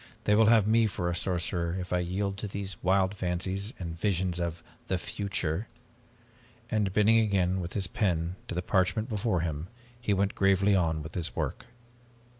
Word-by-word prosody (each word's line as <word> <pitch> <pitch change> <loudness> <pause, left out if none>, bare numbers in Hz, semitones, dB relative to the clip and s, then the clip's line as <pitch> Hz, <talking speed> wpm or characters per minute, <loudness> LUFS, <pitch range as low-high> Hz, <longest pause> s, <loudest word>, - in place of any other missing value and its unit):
They 105 - +3
will 110 +1 +5
have 110 -3 +6
me 110 +1 +4
for 90 -3 -2
a - - -2
sorcerer 85 -1 0
if 90 -1 -4
I 90 - +2
yield 95 +3 -1
to 105 - -4
these 100 -2 -5
wild 95 +1 +2
fancies 95 +2 -2
and 85 -3 -5
visions 90 -2 0
of 85 -1 -3 0.2
the 95 - 0
future." 95 0 -2 1.0
And 105 -4 +1
bending 105 +3 +5
again 95 -4 +2
with 85 0 -5
his 100 -2 0
pen 90 -3 -1
to - - -4
the 90 - -1
parchment 95 +5 +1
before 105 -4 0
him, 80 -1 -3 0.3
he 110 - -1
went 100 +1 +1
gravely 100 +1 +3
on 80 -4 +1
with 80 - -9
his 85 -3 -3
work. - - -3
95 Hz, 180 wpm, -29 LUFS, 85-100 Hz, 1.0 s, have